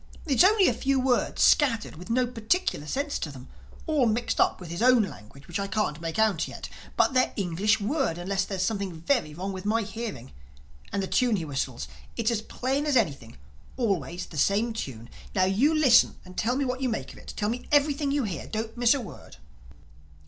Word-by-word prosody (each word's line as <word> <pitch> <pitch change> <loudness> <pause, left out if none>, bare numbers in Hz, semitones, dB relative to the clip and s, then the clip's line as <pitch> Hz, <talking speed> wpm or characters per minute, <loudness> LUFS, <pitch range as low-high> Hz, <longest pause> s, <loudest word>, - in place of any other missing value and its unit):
"It's 285 0 +4
only 395 0 +5
a - - +3
few 275 -1 0
words, 255 -1 +1
scattered, 235 -7 +3
with 180 +6 -11
no 250 +2 +2
particular 230 - -1
sense 285 - -2
to 160 - -3
them—all 245 - -3
mixed 230 +2 0
up - - +2
with 175 -3 -9
his 170 - -4
own 250 -2 +6
language 140 - -10
which 175 +2 -3
I 200 - -2
can't 195 -7 -1
make 165 -1 -4
out 220 -2 +2
yet. - - -8 0.3
But - - +3
they're 255 0 +3
English 195 +3 +1
words, 225 - 0
unless 190 +2 -1
there's 190 -1 -2
something 195 -5 -2
very 170 - 0
wrong 190 +3 -4
with 185 -1 -6
my 220 +2 +1
hearing—And 120 - -8
the - - -2
tune 245 +1 +2
he 170 -5 -3
whistles, 135 - -3 0.3
it's 230 0 +1
as 225 -2 -1
plain 265 +6 -2
as 285 -3 +3
anything—always 145 - -3
the 155 - -6
same 215 +8 +2
tune. 120 - -6 0.3
Now 185 -2 +4
you 210 +11 +3
listen 285 -7 +5
and 185 0 -12
tell 240 +3 0
me 275 +1 0
what 255 +1 -3
you 260 - +1
make 225 - -4
of - - -14
it. - - -10
Tell 210 0 0
me 240 +2 -4
everything 290 0 +3
you 280 -1 +1
hear. 190 -7 -4
Don't 220 +1 -4
miss 240 +1 +4
a 275 - -2
word." 220 - -11
215 Hz, 200 wpm, -27 LUFS, 170-255 Hz, 0.3 s, own